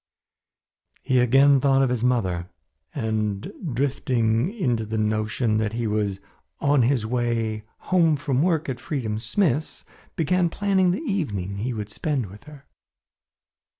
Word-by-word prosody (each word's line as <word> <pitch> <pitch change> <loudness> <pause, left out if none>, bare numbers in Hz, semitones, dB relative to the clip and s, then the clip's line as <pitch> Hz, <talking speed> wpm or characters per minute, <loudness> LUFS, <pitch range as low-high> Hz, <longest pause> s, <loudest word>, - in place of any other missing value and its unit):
He 130 -1 +2
again 135 +3 +5
thought 135 0 +4
of 130 - +1
his 120 -2 -1
mother 95 -9 0 0.5
and 110 - -2 0.2
drifting 125 - +1
into 125 - -1
the 110 +1 -3
notion 110 +1 0
that 110 -1 -1
he 120 0 -2
was 105 -2 -1 0.4
on 145 -1 +3
his 120 -2 +2
way 115 -2 -1 0.3
home 165 -4 +4
from 140 -2 0
work 165 -2 +1
at 130 -3 -3
Freedom 115 -7 -3
Smith's, 155 - 0 0.3
began 175 +2 +1
planning 190 0 +2
the 180 - -1
evening 105 - -2
he 115 +6 -2
would 105 -3 -5
spend 145 -1 -2
with 105 +6 -14
her. 150 -3 -13
125 Hz, 140 wpm, -24 LUFS, 110-150 Hz, 0.5 s, again